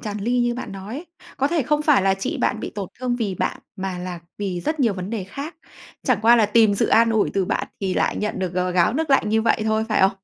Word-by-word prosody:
tràn 210 -1 -4
ly 240 +4 0
như 240 0 +1
bạn 245 -5 -6
nói 195 +4 -7
ấy. 325 +5 -7 0.3
Có 275 +1 +1
thể 335 -4 +1
không 300 +4 +1
phải 295 -9 +4
là 195 0 +3
chị 195 - -3
bạn 215 - 0
bị - - -5
tổn 200 -3 -4
thương 250 -1 -1
vì 210 -6 -2
bạn, - - -2 0.2
mà 190 -2 -4
là 180 -1 -5 0.2
vì 190 -4 -3
rất 310 - -2
nhiều 235 -5 +3
vấn 185 +2 -5
đề 215 -5 -3
khác. 280 - -7 0.5
Chẳng 255 -5 +2
qua 235 +2 +7
là 215 -3 +4
tìm 215 -1 +4
sự - - +1
an 230 0 +4
ủi 220 -2 +2
từ 195 -2 +2
bạn - - -1
thì 190 -2 -1
lại - - +1
nhận 210 - -2
được 185 -2 -2
g 185 - -8 0.2
gáo 175 +3 +3
nước 305 +2 -1
lạnh 270 -6 +4
như 220 +1 +2
vậy 225 -1 +2
thôi, 220 0 +1
phải 215 - +2
không? 190 +1 +5
220 Hz, 280 wpm, -22 LUFS, 195-245 Hz, 0.5 s, qua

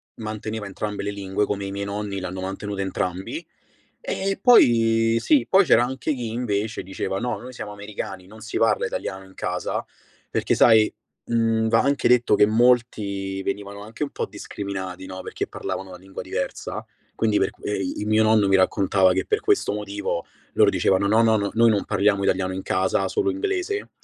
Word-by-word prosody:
manteneva 110 -1 -5
entrambe 105 +1 -4
le 100 - -2
lingue, 100 0 -1
come 100 -1 -3
i 100 - -5
miei 100 0 -4
nonni, 100 -1 -4
l'hanno 95 0 -5
mantenuta 100 +1 -4
entrambi 95 -1 -3 0.6
E 195 0 -2
poi 115 - +5
Sì, 295 - +3
poi 195 +1 +6
c'era 120 -5 +5
anche 130 +4 -2
chi 125 -4 -4
invece 110 -2 -2
diceva: 95 0 -3
"No, 125 - -2
noi 125 +1 -10
siamo 105 - -7
americani, 100 -2 -7
non 110 +3 -13
si 110 +2 -4
parla 115 -1 +2
italiano 95 0 -4
in 95 - -17
casa". 90 0 -3 0.5
Perché - - 0
sai, 110 -2 +5 0.3
mhmm, 115 -1 +1
va 115 - +4
anche 140 0 +1
detto 120 -3 +4
che 105 - +6
molti 105 -4 +1
venivano 100 +1 -4
anche 110 +7 -5
un 145 - -4
po' - - -3
discriminati, 95 -2 -6
no, 95 0 -7
perché - - -4
parlavano 95 - -5
una 90 - -9
lingua 95 +1 -9
diversa. 95 0 -4 0.3
Quindi 110 -2 +2
per 95 - +2
qu - - -25
e 105 -1 -1
i 95 +2 -3
mio 110 +1 +3
nonno 110 -2 +4
mi 95 - +4
raccontava 95 0 +3
che - - -1
per 430 - +1
questo 415 - +1
motivo 100 -4 -3 0.3
loro - - +5
dicevano: 95 +1 +2
"No, 110 +3 +4
no, 110 -1 +4
no, 100 -1 -1
noi 115 +1 +5
non 105 -2 +1
parliamo 100 0 +2
italiano 95 -1 0
in 95 - -4
casa, 95 0 0
solo 390 -2 0
inglese", 390 +5 -2
105 Hz, 185 wpm, -23 LUFS, 95-115 Hz, 0.6 s, poi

